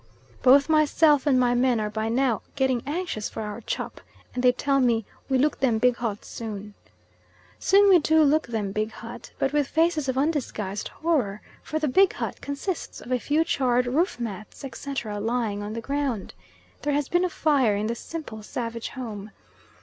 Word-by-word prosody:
Both 275 +2 +6
myself 305 -1 +4
and 260 -3 +4
my 245 -1 +3
men 245 -1 +2
are 210 -1 -2
by 220 +1 -2
now 240 -2 +1
getting 260 -3 +1
anxious 300 - -3
for 220 - -5
our 210 +2 -6
"chop," - - -4 0.3
and 250 - -2
they 250 0 +6
tell 275 +2 +1
me, 235 -4 +2 0.2
"We 265 - +3
look 290 +3 +1
them 245 -4 +2
big 245 +1 +3
hut 220 -4 -3
soon." 210 -2 -7 0.9
Soon 400 +1 +5
we 375 -3 +7
do 315 +1 +4
look 305 0 +3
them 215 -4 -2
big 215 +2 -1
hut, 230 +1 -10
but 270 - 0
with 295 -2 +2
faces 320 -3 +1
of 260 - -1
undisguised 260 -9 -1
horror, 265 -12 -1 0.2
for 310 - -3
the 310 -1 0
big 380 +8 +4
hut - - -5
consists 285 +6 -4
of 250 - -10
a 250 - +2
few 300 +6 +2
charred 250 -5 +1
roof 290 +5 0
mats, 215 +2 -6
etc., 240 -5 -5
lying 220 -2 -1
on 205 +1 -5
the 230 - -4
ground. 275 -5 -2 0.5
There 290 0 0
has 285 -1 0
been 350 +1 +2
a 365 - +1
fire 280 -10 +2
in 205 +1 -1
that 230 - 0
simple 235 -3 -7
savage 230 +1 -4
home. 215 -5 -7
255 Hz, 190 wpm, -25 LUFS, 220-295 Hz, 0.9 s, we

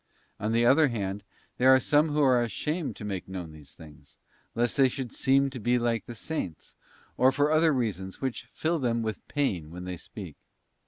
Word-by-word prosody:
On 105 +2 -1
the 115 +1 +3
other 145 +5 +6
hand, 100 -5 -3 0.4
there 130 +1 +5
are 130 0 +8
some 150 +4 +3
who 150 0 +1
are 130 -3 +4
ashamed 150 - -2
to 105 - -8
make 95 -3 -4
known 90 -4 -6
these 75 -2 -14
things, 75 -3 -16 0.4
lest 120 +1 0
they 135 -2 +5
should 125 -2 -5
seem 135 0 +2
to 130 - -7
be 120 +3 +2
like 115 -3 -1
the 120 - -7
Saints, 110 - -5 0.4
or 130 +1 +5
for 145 +3 +1
other 160 +1 +4
reasons 100 - -2
which 130 -2 -4
fill 165 +1 -1
them 120 -3 0
with 110 -2 -5
pain 95 - -1
when 90 +2 -8
they 90 0 -5
speak. - - -9
120 Hz, 200 wpm, -28 LUFS, 95-135 Hz, 0.4 s, are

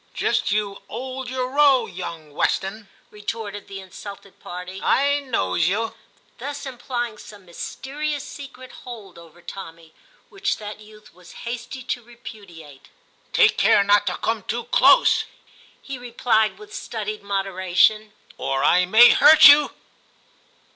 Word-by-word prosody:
* - - -35
Just - - 0
you 205 -1 -2
'old 255 +2 -6
your 255 0 -2
row, 275 -3 +4
young 165 -6 -8
Weston,' 195 +7 -2 0.2
retorted 210 -1 -6
the 195 -1 -8
insulted 195 +1 -11
party; 180 +2 -8
* - - -10
I 285 +1 +2
knows 245 - -1
you 220 +4 -1 0.2
'; - - -36
thus 285 +4 -6
implying 240 -3 -5
some 205 -3 -13
mysterious 285 - -5
secret 260 -2 -11
hold 215 -8 -10
over 170 +1 -17
Tommy, 165 -4 -10 0.4
which 395 0 -2
that 210 -1 -8
youth 215 0 -17
was 180 +4 -14
hasty 240 +2 -6
to 245 0 -3
repudiate. 200 - -13 0.4
*Take - - +4
care 200 - +5
not 205 0 +3
to 180 - -1
come 225 -1 -2
too 235 +5 -4
close,' - - +5 0.6
he 270 -2 -7
replied 235 -3 0
with 420 0 -14
studied 430 0 -5
moderation, 195 +2 +1 0.3
*or 135 0 -1
I 180 +1 +4
may 225 +6 +8
hurt 315 -1 +8
you.' 290 +1 +7
215 Hz, 140 wpm, -22 LUFS, 190-255 Hz, 0.6 s, may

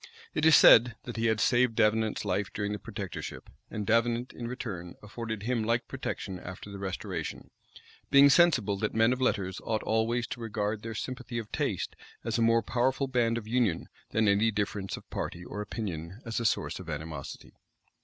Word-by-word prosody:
It 155 +1 +3
is 160 - +8
said, 115 -2 +8
that 120 - -7
he 115 0 +1
had 110 -1 +2
saved 120 0 +3
Davenant's 110 0 +2
life 100 +1 -1
during 105 -1 -2
the 105 - -3
protectorship; - - -7 0.2
and 105 -2 -4
Davenant 115 +2 +1
in 120 - -6
return 100 -9 -6
afforded 110 0 -5
him 120 -1 0
like 115 +2 0
protection 95 -2 -5
after 95 +3 -9
the 100 - -7
restoration; 95 -3 -5 0.6
being 140 +1 +8
sensible 130 - +4
that 105 +2 -2
men 115 +2 +4
of 130 - -5
letters 95 -7 0
ought 110 -2 -1
always 115 +2 +1
to 120 - -6
regard 105 -1 -2
their 115 0 -6
sympathy 125 +1 -5
of 110 -2 -5
taste - - -2 0.3
as - - -1
a - - +2
more 115 0 +4
powerful 130 +2 +1
band 120 -3 +1
of 110 -2 -6
union, 115 -7 0 0.2
than 110 -1 +2
any 105 +3 +4
difference 100 -2 -2
of - - -13
party 85 +1 -4
or 105 - -5
opinion 95 -3 -5
as 115 0 -2
a 115 - -3
source 110 - 0
of 90 -3 -9
animosity. 75 -2 -6
110 Hz, 185 wpm, -29 LUFS, 100-120 Hz, 0.6 s, is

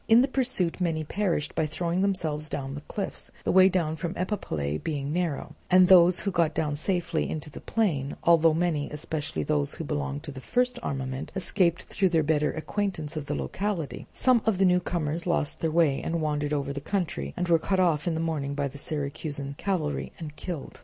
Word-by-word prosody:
In 230 +2 +7
the - - +2
pursuit 245 -11 +1
many 165 -3 0
perished 170 -2 -1
by 155 - 0
throwing 170 +3 -1
themselves 160 -6 0
down 135 -1 -4
the 145 - -6
cliffs, 195 +6 -4
the - - +1
way 190 0 +7
down 170 -4 0
from 170 +1 -4
Epipolae 80 - -2
being 145 -2 -2
narrow; 170 -4 -2 0.2
and 185 0 +7
of 180 - +3
those 180 -1 +7
who 200 - -1
got 170 -3 +1
down 150 -2 0
safely 175 +1 -1
into 150 -1 -5
the - - -9
plain, 155 -12 0
although 165 -1 +6
many, 165 -4 0
especially 150 - -3
those 70 -1 +1
who - - -5
belonged 70 0 -3
to - - -6
the 130 -1 -9
first 250 - 0
armament, 130 -1 -4
escaped 180 -2 +2
through 190 -1 +1
their 165 -2 +2
better 150 0 +2
acquaintance 160 -2 -3
with 150 -2 -4
the - - -1
locality, 190 -7 -3
some 255 -3 +3
of 215 -4 +3
the 195 - +4
newcomers 175 -2 0
lost 165 -4 0
their 165 - 0
way 155 -4 +2
and 170 0 -1
wandered 150 -1 -1
over 140 -1 -1
the 140 - -5
country, 180 +2 -2
and 180 0 -1
were 165 -1 +4
cut 190 +3 0
off 170 -4 +2
in 165 - +1
the - - -2
morning 150 -4 -2
by 140 -1 0
the 140 +1 -8
Syracusan 140 -1 -3
cavalry 175 -7 -1
and 150 -3 -7
killed. 165 -3 -6
160 Hz, 205 wpm, -27 LUFS, 145-180 Hz, 0.2 s, In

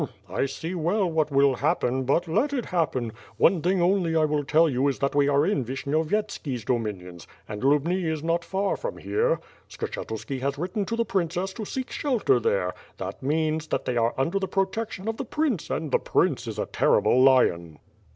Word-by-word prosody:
"llm! - - -2 0.2
I 140 - 0
see 160 +6 -5
well 185 +4 +1
what 155 -1 +1
will 140 -1 +4
happen, 130 +3 0
but 165 +7 +1
let 230 - +1
it 250 -5 -1
happen! 130 -10 -1 0.3
One 175 -2 +4
thing 180 +1 +2
only 175 -3 +2
I 160 -1 +4
will 150 -1 0
tell 160 +4 +4
you 140 0 +1
that 140 +1 -1
we 145 -1 +3
are 145 +1 +3
in 180 -9 +1
Vishnyovyetski's 140 - -2
do 120 +1 +1
minions, 90 -6 -7 0.2
and 105 -1 -6
Lubni 150 +7 +2
is 160 -2 -2
not 170 +1 0
far 195 +2 -1
from - - -5
here. - - 0 0.3
Skshetuski 150 - -5
has 140 +1 -1
written 185 +6 -2
to 230 - -2
the 230 0 0
princess 185 0 -1
to 220 0 -6
seek 260 +4 -5
shelter 285 - +1
there, 480 +2 0 0.2
that - - -6
means, 155 +3 0
that - - -2
they 125 - -1
are 115 0 +1
under 165 +9 +1
the 190 - -2
protection 195 +1 -2
of 225 0 -2
the - - -3
prince 265 - -1
an^ 155 -3 -3
the - - +3
prince 135 -9 +1
is 110 -2 -5
a - - -1
terrible 130 - +3
lion." 85 - +3
160 Hz, 200 wpm, -26 LUFS, 135-195 Hz, 0.3 s, will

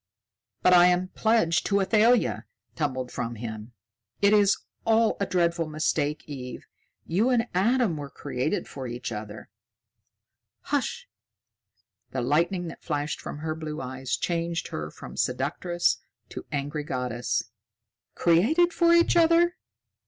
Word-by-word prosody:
"But 180 - +6
I 175 0 +8
am 180 +1 +1
pledged 220 -8 +2
to 200 -1 +2
Athalia!" 220 +5 +3 0.3
tumbled 130 -5 -2
from 120 -1 -4
him. 110 0 -7 0.5
"It 200 +1 +4
is 205 -1 +5 0.3
all 225 0 +3
a 200 - 0
dreadful 170 -2 +1
mistake, 155 -1 -1
Eve. 130 -4 -7 0.4
You 200 +9 +1
and 245 -2 +2
Adam 215 -1 +2
were 145 -1 -6
created 140 +7 -3
for 130 -2 -7
each 120 0 -5
other." 105 0 -7 1.1
"Hush!" - - -2 1.1
The 130 - -1
lightning 170 +7 +1
that - - -11
flashed 145 -2 -3
from - - -6
her 155 - -1
blue 155 -1 -6
eyes 130 0 -3
changed 170 -1 -2
her 75 0 -4
from - - -11
seductress 155 +7 0 0.3
to - - -8
angry 145 +1 -3
goddess. 125 -3 -2 0.6
"Created 295 - +3
for 340 -1 +4
each 340 0 +4
other! 340 +1 +4
165 Hz, 130 wpm, -26 LUFS, 130-205 Hz, 1.1 s, I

